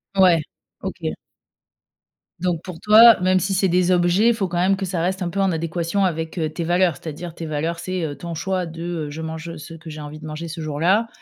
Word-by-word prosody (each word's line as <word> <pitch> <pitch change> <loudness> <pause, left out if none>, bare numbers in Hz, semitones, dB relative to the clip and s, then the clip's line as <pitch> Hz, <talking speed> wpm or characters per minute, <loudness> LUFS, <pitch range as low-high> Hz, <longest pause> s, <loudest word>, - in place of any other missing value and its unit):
Ouais, 180 -4 +5 0.4
OK. - - -4 1.3
Donc, 175 -2 -1
pour 180 -3 -8
toi, 225 +1 +8
même 185 +1 +3
si 195 +1 -1
c'est 190 +1 +3
des 180 0 +2
objets, 180 +4 +3
il 235 - +3
faut 195 -4 -1
quand 175 0 -3
même 190 +2 +3
que 195 0 -3
ça 175 -2 -2
reste 185 +2 -1
un 175 - -2
peu 195 +3 -4
en 195 -1 +2
adéquation 170 +3 -1
avec, 160 -1 -3
heu, 160 -2 0
tes 170 - -4
valeurs, 175 -1 +2
c'est-à-dire 165 +3 -7
tes 165 0 -6
valeurs. 160 +2 -2
C'est, 185 -1 -3
heu, 145 -2 -3
ton 170 +1 -6
choix 185 +1 -2
de, 165 0 -9 0.3
heu, - - -6
je 155 +2 -7
mange, 160 +1 -6
ce 155 +2 -10
que 165 0 -10
j'ai 155 0 -7
envie 150 +1 -8
de 155 - -10
manger 155 +2 -6
ce 160 0 -6
jour-là. 170 +9 +1
170 Hz, 235 wpm, -22 LUFS, 160-185 Hz, 1.3 s, toi